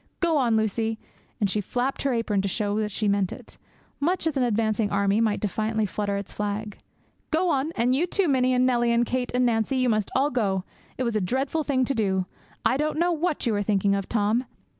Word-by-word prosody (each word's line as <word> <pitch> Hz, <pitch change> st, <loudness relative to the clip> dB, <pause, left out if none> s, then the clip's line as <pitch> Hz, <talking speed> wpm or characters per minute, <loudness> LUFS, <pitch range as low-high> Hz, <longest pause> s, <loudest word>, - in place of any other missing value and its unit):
'Go 335 Hz, -2 st, +2 dB
on, 235 Hz, -5 st, +2 dB
Lucie,' 220 Hz, +1 st, 0 dB, 0.4 s
and 205 Hz, -, +2 dB
she 210 Hz, +2 st, -1 dB
flapped 250 Hz, +6 st, -2 dB
her 275 Hz, -, +1 dB
apron 225 Hz, -4 st, 0 dB
to 200 Hz, -, -2 dB
show 205 Hz, +1 st, -1 dB
that 215 Hz, -1 st, -1 dB
she 210 Hz, +1 st, -1 dB
meant 200 Hz, -2 st, +1 dB
it, -, -, -11 dB, 0.4 s
much 345 Hz, +4 st, 0 dB
as 320 Hz, -3 st, 0 dB
an 270 Hz, -, +1 dB
advancing 220 Hz, -2 st, +1 dB
army 200 Hz, +2 st, +2 dB
might 215 Hz, -2 st, +1 dB
defiantly 215 Hz, +1 st, -1 dB
flutter 200 Hz, 0 st, -2 dB
its 200 Hz, -1 st, -6 dB
flag. 210 Hz, 0 st, -4 dB, 0.5 s
'Go 340 Hz, +2 st, +2 dB
on; 280 Hz, +3 st, 0 dB
and 240 Hz, +2 st, +2 dB
you 315 Hz, +7 st, +1 dB
too, 385 Hz, 0 st, +1 dB
Minnie; 255 Hz, -2 st, +2 dB
and 250 Hz, 0 st, +3 dB
Nellie, 240 Hz, -2 st, +2 dB
and 235 Hz, +1 st, +3 dB
Kate, 250 Hz, +1 st, -2 dB
and 250 Hz, 0 st, +3 dB
Nancie; 225 Hz, +3 st, +1 dB
you 255 Hz, -1 st, +2 dB
must 215 Hz, -3 st, +1 dB
all 280 Hz, +3 st, +2 dB
go! 195 Hz, -6 st, 0 dB, 0.3 s
It 255 Hz, -, -1 dB
was 235 Hz, -2 st, -1 dB
a 215 Hz, -, +1 dB
dreadful 265 Hz, -, -1 dB
thing 260 Hz, -3 st, +1 dB
to 275 Hz, -, 0 dB
do; 190 Hz, -6 st, 0 dB, 0.4 s
I 260 Hz, -, +3 dB
don't 305 Hz, +1 st, -1 dB
know 345 Hz, +2 st, +2 dB
what 335 Hz, -2 st, -1 dB
you 230 Hz, -, +1 dB
were 205 Hz, -, 0 dB
thinking 200 Hz, -1 st, +2 dB
of, 195 Hz, -1 st, -2 dB
Tom!' 225 Hz, +3 st, +1 dB
230 Hz, 225 wpm, -25 LUFS, 205-265 Hz, 0.5 s, and